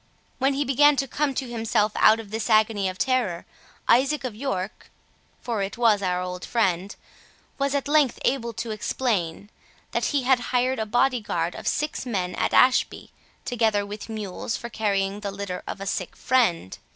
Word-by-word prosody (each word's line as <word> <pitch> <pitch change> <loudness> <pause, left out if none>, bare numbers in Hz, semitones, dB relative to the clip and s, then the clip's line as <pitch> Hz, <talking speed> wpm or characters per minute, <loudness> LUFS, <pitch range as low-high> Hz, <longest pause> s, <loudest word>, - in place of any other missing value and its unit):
When 270 +1 +2
he 285 +1 0
began 290 +3 +5
to 275 0 -1
come 285 0 -1
to 260 - -2
himself 225 -2 0
out 220 +1 +5
of 210 -3 -9
this 220 0 -3
agony 215 -3 +3
of 185 - -7
terror, 240 -10 0 0.4
Isaac 275 +4 +3
of 255 -4 -3
York 210 -5 -4 0.5
(for 230 -4 -2
it 195 +2 -4
was 225 -4 +3
our 180 -1 0
old 180 0 -6
friend) 190 -4 0 0.6
was 280 0 0
at 280 - -1
length 290 -4 +3
able 235 -3 0
to 225 +1 -4
explain, 205 -4 -2 0.4
that - - 0
he 285 -3 0
had 260 0 +4
hired 255 0 +1
a 220 - -2
body 245 +2 +2
guard 170 -4 -2
of - - -7
six 300 +1 -1
men 190 -8 -2
at - - -1
Ashby, 255 0 +3 0.3
together 220 -4 +1
with 210 +2 -8
mules 215 0 -4
for 235 - -8
carrying 200 -2 -1
the 205 -1 -4
litter 195 -2 -5
of - - -5
a 195 - -5
sick 185 -2 -3
friend. 200 - +1
225 Hz, 180 wpm, -25 LUFS, 200-255 Hz, 0.6 s, began